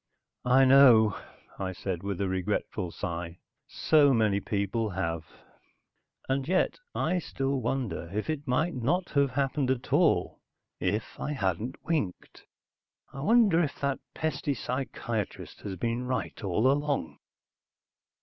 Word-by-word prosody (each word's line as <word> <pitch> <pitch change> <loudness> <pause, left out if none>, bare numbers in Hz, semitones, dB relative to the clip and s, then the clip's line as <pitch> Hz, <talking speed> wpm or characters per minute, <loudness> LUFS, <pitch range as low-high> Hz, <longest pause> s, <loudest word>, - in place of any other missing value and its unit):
"I 135 +2 +6
know," 125 -6 +7 0.4
I 95 -1 -2
said 90 -2 -4
with 100 -2 -4
a 100 - +1
regretful 95 0 -2
sigh. 85 -2 -5 0.3
"So 145 -4 +4
many 105 -3 +2
people 105 +2 -1
have." 85 -4 -3 1.0
And 135 0 -1
yet, 185 +2 +1 0.2
I 180 +3 +1
still 135 -4 -2
wonder 115 -9 -2
if 105 +2 -3
it 150 -2 -3
might 160 +7 +1
not 150 +9 -1
have 140 -1 +3
happened 135 +1 0
at 130 -2 -2
all - - +2 0.4
if 105 +4 -2
I 150 - -2
hadn't 105 - -2
winked. 150 - -3 0.7
I 140 - -7
wonder 205 - +4
if 150 -5 -2
that 140 -1 0 0.2
pesty 145 -3 -1
psychiatrist 120 -4 -4
has 100 -2 -5
been 115 +6 -2
right, 125 -2 -3
all 105 +7 +2
along? 145 - -1
125 Hz, 130 wpm, -28 LUFS, 100-140 Hz, 1.0 s, know